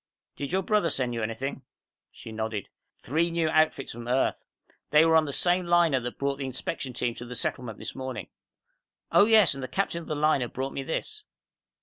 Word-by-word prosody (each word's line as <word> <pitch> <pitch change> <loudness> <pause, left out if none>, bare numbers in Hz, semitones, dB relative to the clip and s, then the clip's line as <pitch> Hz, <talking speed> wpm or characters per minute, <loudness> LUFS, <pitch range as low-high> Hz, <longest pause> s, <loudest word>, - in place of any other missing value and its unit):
"Did 140 +1 -5
your 190 +1 +1
brother 210 -3 +2
send 125 -4 0
you 115 - -2
anything?" 115 +5 -3 0.5
She 115 - -11
nodded. 110 -2 -4 0.3
"Three 160 +7 0
new 165 -1 0
outfits 155 -3 +2
from 120 +1 -8
Earth. 130 +2 +1 0.5
They 150 +2 +6
were 165 0 +4
on 160 -1 +5
the 145 - -4
same 175 +4 +2
liner 170 -5 +4
that 125 0 -6
brought 140 0 -1
the 135 - -4
inspection 130 +1 -4
team 120 -1 -1
to 120 - -8
the 125 +1 -7
Settlement 115 -1 -2
this - - -6
morning. 130 -6 -6 0.8
Oh, - - +7
yes, 215 -8 +6
and 135 - -6
the 130 - -4
captain 180 -1 -1
of - - -12
the 155 - -2
liner 150 -4 +2
brought 135 +3 -4
me - - -3
this." 425 - -4
140 Hz, 205 wpm, -27 LUFS, 125-165 Hz, 0.8 s, Oh